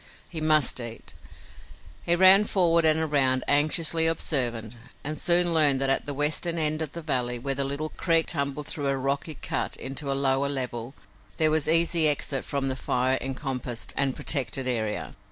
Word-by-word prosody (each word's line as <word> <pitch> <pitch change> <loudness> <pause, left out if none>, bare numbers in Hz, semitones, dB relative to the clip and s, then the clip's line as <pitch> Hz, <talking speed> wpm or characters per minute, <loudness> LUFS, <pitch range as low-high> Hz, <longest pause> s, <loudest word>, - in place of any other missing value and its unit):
He 160 -3 -6
must 155 -4 +3
eat. 115 -1 -7 0.9
He 170 - +2
ran 190 +3 +6
forward 170 -5 +2
and 155 0 +4
around, 135 -4 +1
anxiously 160 +3 +2
observant, 120 -9 -1 0.3
and 150 +2 -5
soon 175 0 +2
learned 145 -4 +3
that 135 0 +1
at 135 - -1
the 145 - -3
western 155 +4 0
end 155 0 0
of 155 -2 -5
the 170 - -8
valley, 125 -5 -2
where 135 +3 -3
the 140 +1 -2
little 140 +3 -3
creek 165 -1 0
tumbled 140 -1 -3
through 145 -1 -3
a 135 0 0
rocky 140 +4 -3
cut - - -4
into 140 +1 -5
a 135 - -1
lower 135 0 0
level, 125 -2 -3 0.4
there 155 -1 +3
was 155 -2 0
easy 165 0 +5
exit 140 -2 0
from 140 -1 -3
the 130 - -2
fire 130 0 -1
encompassed 130 -3 -4
and 135 -2 0
protected 135 -1 0
area. 110 -4 -3
140 Hz, 175 wpm, -25 LUFS, 135-160 Hz, 0.9 s, ran